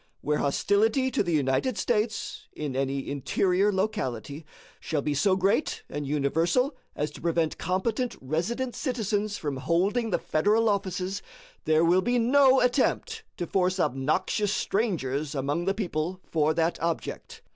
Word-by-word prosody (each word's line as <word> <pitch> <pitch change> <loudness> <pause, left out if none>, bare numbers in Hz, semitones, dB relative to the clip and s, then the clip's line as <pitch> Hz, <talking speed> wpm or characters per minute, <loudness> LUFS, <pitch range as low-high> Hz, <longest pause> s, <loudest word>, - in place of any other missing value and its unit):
Where 150 0 0
hostility 220 - +2
to - - +1
the 175 -4 -1
United 150 - +1
States, 220 -2 -1
in 145 -4 -4
any 135 0 -1
interior 180 +8 +1
locality, 155 - -3 0.3
shall 150 -3 -2
be 150 - 0
so 185 +7 +3
great 195 +10 0
and 145 -1 -4
universal 165 - +1 0.2
as 150 +1 -2
to - - -12
prevent 165 -1 0
competent 225 +8 -1
resident 195 - -2
citizens 215 -6 -1
from 145 -3 -3
holding 195 - +1
the 185 - +1
Federal 215 +8 +2
offices, 190 -1 -2 0.4
there 155 +1 +4
will 180 +3 +4
be 245 +6 +1
no 265 +2 +5
attempt 440 - +1
to 175 - -2
force 185 +1 0
obnoxious 175 - 0
strangers 155 - -1
among 145 +5 -1
the 195 +1 +1
people 180 -3 -2
for 155 -1 +1
that 165 +1 +1
object. 165 -1 -4
180 Hz, 145 wpm, -27 LUFS, 150-215 Hz, 0.4 s, no